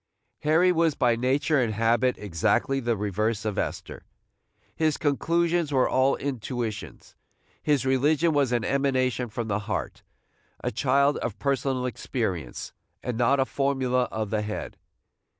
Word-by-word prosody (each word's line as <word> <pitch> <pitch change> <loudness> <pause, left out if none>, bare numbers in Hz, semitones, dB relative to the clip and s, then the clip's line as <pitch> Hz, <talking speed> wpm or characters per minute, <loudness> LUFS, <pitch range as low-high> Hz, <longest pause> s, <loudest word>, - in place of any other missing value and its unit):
Harry 165 +4 +4
was 165 -3 +2
by 120 -3 +3
nature 135 +4 +1
and 110 -3 -1
habit 115 +3 +2
exactly 105 +8 0
the 120 -3 -1
reverse 105 +2 -1
of 105 -2 -1
Esther. - - -4 0.7
His 155 -2 +1
conclusions 170 +2 +1
were 130 -2 +3
all 130 +1 +3
intuitions. 120 -5 -5 0.5
His 145 -4 +1
religion 150 +5 +2
was 140 -4 +2
an 120 -3 0
emanation 130 -3 0
from 115 +1 -4
the 100 -1 0
heart, 95 - -3 0.6
a - - -1
child 140 +4 +2
of 115 - -4
personal 135 -2 0
experience, 95 - -3 0.3
and 125 - -3
not 125 +4 +3
a 135 - +3
formula 130 -2 0
of 110 -3 -4
the 110 -1 +1
head. 105 0 -5
130 Hz, 140 wpm, -26 LUFS, 115-140 Hz, 0.7 s, Harry